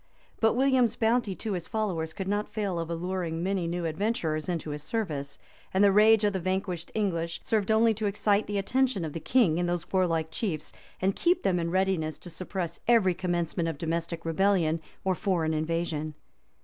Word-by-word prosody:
[*] - - -33
But 225 0 +4
William's 255 -3 +3
bounty 225 -3 +1
to 215 +1 -3
his 175 -3 -4
followers 180 -8 -2
could 190 +2 -5
not 205 +1 -1
fail 205 -5 -2
of 165 0 -4
alluring 170 -1 -2
many 190 -2 0
new 175 0 -2
adventurers 160 -2 -1
into 165 -3 -2
his 145 0 -5
service; 150 -7 -3 0.4
and 190 - +5
the 200 - +6
rage 215 +2 +6
of 205 -1 +2
the 190 - -1
vanquished 185 -1 -2
English 170 -6 -1
served 215 -3 0
only 220 +1 +4
to 215 0 -2
excite 205 +1 +1
the 205 - -2
attention 245 -2 +1
of 155 - -5
the 165 - -4
king 180 - +3
and 175 0 0
those 175 -1 -3
warlike 165 -4 +1
chiefs, 160 -6 -3 0.3
and 195 +1 +2
keep 350 +1 +2
them 185 -3 +2
in 170 0 -1
readiness 185 -4 0
to 175 - -11
suppress 180 -1 -4
every 225 -6 +5
commencement 175 -2 -1
of 160 - -5
domestic 165 +1 -3
rebellion 165 -2 +2 0.2
or 190 - +2
foreign 170 -4 0
invasion. 155 -1 -2
185 Hz, 190 wpm, -28 LUFS, 165-205 Hz, 0.4 s, the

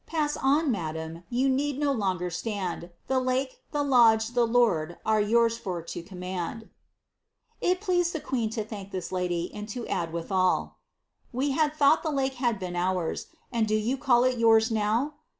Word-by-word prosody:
Pass 300 -2 0
on, 285 +2 +2
madame, 160 -3 -4
you 255 +3 +1
need 275 +1 0
no 290 -1 +1
longer 185 -7 -1
stand, 180 -2 -4 0.2
The 265 -1 +1
lake, 255 +1 -1
tlie 290 -1 -1
lodge, 225 -4 +5
the 240 -1 +2
lord, 190 -9 +2
are 220 -1 +3
yours 230 +2 +2
for 180 -5 -4
to 170 - -6
command." 185 +4 -6 0.9
It 360 +1 +1
pleased 355 -4 +1
the 320 - -2
queen 240 -6 -2
to 215 - 0
thank 205 -3 -8
this 185 -3 -5
lady, 180 -1 -1
and 210 +1 -7
to 235 +2 -5
add 165 -1 -2
withal, 185 +2 0
^ - - -45 0.5
We 270 +3 0
had 300 +2 +1
thought 300 +1 +4
the 320 - -2
lake 270 -2 0
had 240 -4 +1
been 180 -2 -5
ours, 180 -1 -1 0.2
and 230 -2 +1
do 215 - +1
you 220 +5 0
call 245 -2 +3
it 255 -1 +1
yours, 225 0 +5
now 225 +7 +1
225 Hz, 185 wpm, -27 LUFS, 185-265 Hz, 0.9 s, lodge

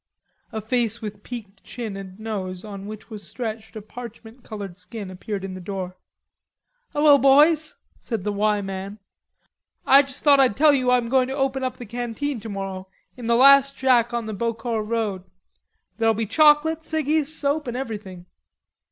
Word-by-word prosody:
A 220 - -4
face 230 0 -1
with 210 -2 -7
peaked 210 -5 -9
chin 225 -5 -6
and 195 0 -9
nose 195 -4 -5
on 200 -1 -8
which 215 +2 -10
was 210 -2 -7
stretched 220 -1 -6
a 215 - -7
parchment 235 +1 -11
colored 200 -5 -7
skin 195 +1 -8
appeared 195 +2 -5
in 195 -1 -5
the 185 - -8
door. 185 -1 -5 1.0
"Hello, 290 -1 +5
boys," 300 +3 +4 0.2
said 225 -6 -4
the 210 - -1
"Y" 210 0 +1
man. 195 +1 -6 0.9
"I 275 +1 +8
just 275 -1 -6
thought 285 -2 +6
I'd 255 -6 +3
tell 300 0 +6
you 255 -2 +1
I'm 250 -1 +3
going 255 +1 +2
to 265 - -4
open 270 -1 0
the 255 -1 -4
canteen 240 +4 -4
tomorrow, 195 -3 -6 0.3
in 245 -2 -7
the 235 - +3
last 275 +2 +6
shack 245 -3 +3
on 235 -1 -2
the 220 - -5
Beaucourt 225 0 -2
road. 215 -5 -2 0.8
There'll 225 -1 +3
be 225 +1 -1
chocolate, 305 +6 +4
ciggies, 315 -1 0
soap, 295 -1 -1
and 240 0 -3
everything." 205 -8 -6
230 Hz, 170 wpm, -23 LUFS, 205-265 Hz, 1.0 s, I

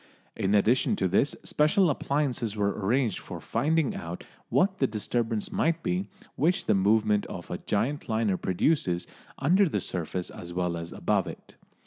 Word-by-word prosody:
In 100 +2 +1
addition 115 +5 +3
to 95 - 0
this, 130 +10 +2
special 175 +6 +3
appliances 135 -6 -1
were 100 -1 +1
arranged 110 +3 0
for - - -8
finding 150 +5 +1
out 85 +1 -6 0.3
what 190 +1 +2
the 135 - +3
disturbance 115 0 -2
might 165 0 0
be 180 +2 -1 0.3
which 165 +6 +1
the - - +3
movement 105 +1 +2
of - - -8
a - - -3
giant 135 +8 -1
liner 110 -3 +1
produces 90 - 0 0.3
under 180 +7 +3
the - - 0
surface 90 0 -3
as 85 0 -8
well 90 -1 -1
as 85 0 -6
above - - 0
it. - - -10
115 Hz, 160 wpm, -28 LUFS, 95-150 Hz, 0.3 s, addition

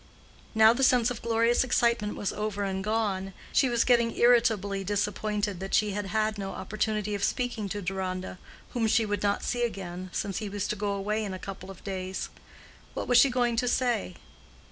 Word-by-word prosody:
Now 220 +1 +7
the 255 - -3
sense 245 -2 +4
of 235 - -6
glorious 230 +1 +2
excitement 235 -4 +1
was 205 - -2
over 210 -1 -2
and 190 -1 -2
gone, 200 -3 -1 0.2
she 265 - +4
was 235 -1 +2
getting 235 -2 +2
irritably 220 -5 +3
disappointed 205 0 -1
that 195 +1 -1
she 210 -1 +2
had 205 0 -3
had 215 +1 0
no 195 -1 -4
opportunity 215 0 -2
of 200 -1 -2
speaking 240 -5 -1
to 205 +1 -4
Deronda, 185 0 -4 0.3
whom 230 -2 0
she 220 0 +3
would 205 -1 -2
not 200 0 0
see 245 - -1
again, 185 -5 -4
since 195 0 -2
he 210 - -4
was 205 0 -3
to - - 0
go 205 0 -1
away 210 +2 -1
in 195 -3 -4
a - - -5
couple 190 0 -8
of 195 - -11
days. 190 -1 -4 0.7
What - - -3
was 245 -1 +6
she 275 - +6
going 245 -2 +1
to 245 - +1
say? 240 -7 0
210 Hz, 195 wpm, -28 LUFS, 195-230 Hz, 0.7 s, Now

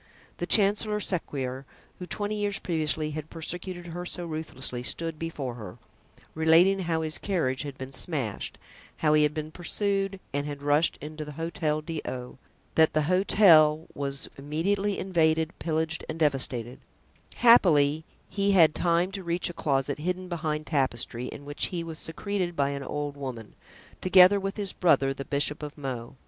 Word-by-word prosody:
The - - -3
Chancellor 210 +1 +3
Sequier, 135 -9 -2 0.4
who 180 - -7
twenty 205 +2 -3
years 205 -1 0
previously 155 -2 -1
had 155 +1 -6
persecuted 175 +2 -5
her 175 +1 -6
so 175 0 -5
ruthlessly, 155 -6 -3
stood 165 +5 -2
before 150 -6 -4
her, 105 -6 -9 0.6
relating 165 +5 +5
how 165 -3 -1
his 155 0 -3
carriage 160 -10 -1
had 140 -3 -6
been 130 0 -7
smashed, 130 - -4 0.4
how 150 -1 +2
he 155 - +5
had 150 0 +2
been 155 0 -4
pursued 195 +3 -2
and 145 +1 -1
had 145 -1 -6
rushed 145 +3 +2
into 155 +1 -6
the 150 0 -8
Hotel 160 -1 -2
d'O——, 130 -6 -6 0.3
that 160 -1 +4
the 155 - +2
hotel 165 -3 +5
was 140 -1 -3
immediately 195 +8 -1
invaded, 160 -3 +1
pillaged 160 0 -1
and - - -4
devastated; 130 -5 0 0.6
happily 160 -11 +5 0.2
he 200 0 +1
had 165 -5 +6
time 175 +2 +1
to 195 -1 -6
reach 175 0 -1
a - - -13
closet 140 -2 0
hidden 180 +3 -2
behind 155 -3 -3
tapestry, 125 -5 -1
in 140 - -9
which 145 0 -1
he 175 -2 -4
was 165 -1 -7
secreted 180 +1 -2
by 140 -2 +1
an 140 0 -4
old 145 +1 -4
woman, 125 -6 -7 0.5
together 185 +2 +7
with 195 +1 -4
his 200 -2 -1
brother, 140 -6 +3
the 135 - -6
Bishop 145 +1 -1
of 150 0 -7
Meaux. 130 -5 -5
160 Hz, 160 wpm, -27 LUFS, 145-180 Hz, 0.6 s, together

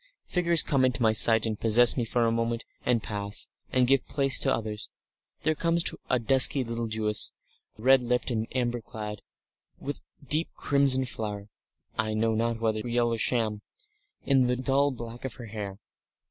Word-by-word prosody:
Figures 170 -2 +2
come 135 -4 0
into 125 -2 0
my 110 -1 +3
sight 110 0 +6
and 110 -2 -4
possess 115 +2 +5
me 125 - -1
for 120 +1 0
a 115 - +1
moment 115 0 -2 0.2
and 120 -3 +1
pass, 100 -1 -3 0.2
and 130 -1 +3
give 135 +2 +1
place 135 -2 +2
to - - +2
others; 110 -1 -4 0.5
there 155 - +2
comes 165 +2 +1 0.3
a 125 - +2
dusky 130 +3 +5
little 115 -1 -4
Jewess, 110 -1 -1 0.4
red 130 +4 +4
lipped 125 +1 -1
and 110 -1 -2
amber 120 -1 -1
clad, 105 -1 -8 0.6
with 145 +1 -5 0.2
a - - -19
deep 155 +5 +2
crimson 140 -2 +1
flower 105 -4 -6 0.5
I 110 0 -1
know 110 +1 0
not 115 +1 -1
whether 110 -1 -1
real 120 0 -1
or 115 - -3
sham 110 -3 0 0.6
in 135 -2 +3
the 125 - 0
dull 135 +3 +1
black 120 -2 -9
of 130 -3 -5
her 120 - -10
hair. 105 -3 -7
120 Hz, 175 wpm, -27 LUFS, 110-130 Hz, 0.6 s, sight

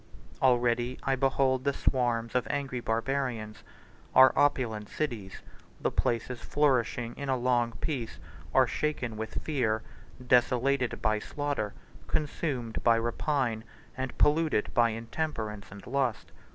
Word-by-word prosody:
Already 120 -1 +2
I 135 - +2
behold 130 -1 +2
the 140 0 +1
swarms 120 -4 0
of 125 -2 +1
angry 140 -3 -2
Barbarians: 115 -2 -2 0.6
our 130 0 +8
opulent 120 -7 +1
cities, 115 -11 -4 0.4
the - - 0
places 120 +1 -1
flourishing 125 -4 +1
in 140 -1 -4
a 130 - +2
long 120 -1 +1
peace, 120 +2 -4 0.3
are - - +5
shaken 130 -7 -2
with 110 0 -5
fear, 115 -8 0 0.4
desolated 125 +1 +2
by 110 0 +2
slaughter, 145 -5 -3 0.3
consumed 135 -6 -2
by 115 -1 +5
rapine, 120 0 -1 0.3
and 130 -1 -4
polluted 155 -6 +2
by 120 -1 +4
intemperance 115 -3 -4
and 100 +1 -11
lust. 125 -5 -1
125 Hz, 125 wpm, -29 LUFS, 115-135 Hz, 0.6 s, our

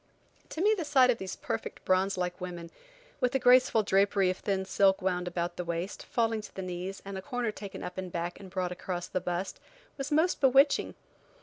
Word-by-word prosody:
To 315 - -4
me 425 +3 +5
the 360 - -3
sight 265 -4 +5
of 235 - -3
these 190 -1 -5
perfect, 110 - -5
bronze 190 +1 +2
like 180 0 -3
women, 175 -2 -6 0.5
with 250 0 +1
a - - +6
graceful 250 -3 +5
drapery 195 -1 +3
of 185 - -5
thin 195 -2 -1
silk 195 0 +3
wound 180 -2 -1
about 175 0 -3
the 180 - -2
waist, 170 +3 -4
falling 225 -2 0
to 210 - -12
the 190 - -4
knees, 185 +2 -5
and 195 -1 -5
a - - -7
corner 240 +2 -2
taken 205 -2 -8
up 180 - -5
the - - -1
back 175 -1 -4
and 195 - -10
brought 185 -1 -2
across 180 -1 -4
the 185 - -3
bust, 180 +2 -3 0.4
was 275 +2 -3
most 320 +4 +2
bewitching. 275 +2 +4
190 Hz, 210 wpm, -30 LUFS, 180-240 Hz, 0.5 s, a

